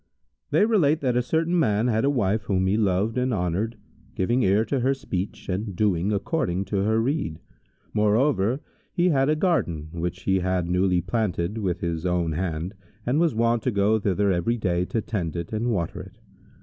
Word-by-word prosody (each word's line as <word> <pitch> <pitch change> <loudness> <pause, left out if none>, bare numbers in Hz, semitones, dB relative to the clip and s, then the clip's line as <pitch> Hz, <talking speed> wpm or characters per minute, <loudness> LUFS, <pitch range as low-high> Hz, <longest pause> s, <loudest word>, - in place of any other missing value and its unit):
They - - +4
relate 165 -9 +3
that 125 -3 +1
a 125 - +3
certain 165 +7 +1
man 110 -6 +2
had 110 -2 +1
a 140 - +3
wife 110 -6 0
whom 95 -1 +1
he 95 +2 +2
loved 105 +2 +1
and 125 +1 0
honoured, 100 +3 -1 0.4
giving 120 - +1
ear 100 +1 +3
to 135 - -1
her 135 +3 +2
speech 100 -9 -5
and 100 +1 -3
doing 100 -1 +1
according 100 - -1
to - - +2
her 110 +3 +2
rede. 115 - -1 0.5
Moreover, 110 +3 +2 0.3
he 180 0 +2
had 135 -3 +2
a 155 - +3
garden, 120 - 0
which 90 +2 -4
he 95 -1 +2
had 90 -1 0
newly 90 0 +2
planted 95 0 -1
with 95 -5 -2
his 85 -2 -2
own 90 -2 0
hand, 85 +2 -3 0.3
and 130 +5 +1
was 165 -7 +2
wont 115 0 +2
to 125 - 0
go 105 0 +2
thither 100 0 +1
every 95 +7 0
day, 90 -4 0
to 115 - -2
tend 90 -8 -3
it 85 +4 -5
and 115 +3 0
water 90 -8 -2
it. - - -13
105 Hz, 190 wpm, -25 LUFS, 90-125 Hz, 0.5 s, They